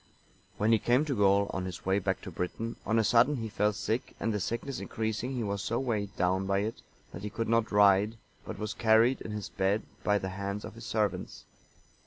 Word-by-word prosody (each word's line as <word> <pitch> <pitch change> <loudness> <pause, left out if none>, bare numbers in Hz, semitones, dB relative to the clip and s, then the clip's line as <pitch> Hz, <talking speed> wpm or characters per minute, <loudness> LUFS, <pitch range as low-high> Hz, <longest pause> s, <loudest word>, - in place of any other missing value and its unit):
When 105 +2 +2
he 115 - +5
came 125 +8 +3
to 140 -4 -1
Gaul, 100 -1 +3
on 95 -1 -2
his 90 -2 -7
way 95 +1 +2
back 95 0 -1
to 95 - -8
Britain, 110 +7 -4
on 110 - +2
a 110 - +4
sudden 120 +7 +4
he 115 -4 -4
fell 105 +1 +1
sick, 110 +4 -3
and 115 - 0
the 105 - -1
sickness 115 +7 -3
increasing, 110 +3 -3
he 120 - -1
was 100 -1 -2
so 115 +4 -1
weighed 105 -6 -2
down 95 +2 +1
by 100 0 +2
it, 110 +2 -4 0.3
that 90 - -8
he 105 - -4
could 115 +2 -3
not 115 0 +2
ride, 100 +2 +4 0.3
but 110 - -7
was 105 +1 -3
carried 115 +3 +4
in - - -6
his 105 -2 -5
bed 95 +3 0 0.2
by 105 - +3
the 95 -1 -3
hands 100 +2 -4
of - - -8
his - - -9
servants. - - -2
105 Hz, 225 wpm, -30 LUFS, 100-115 Hz, 0.3 s, he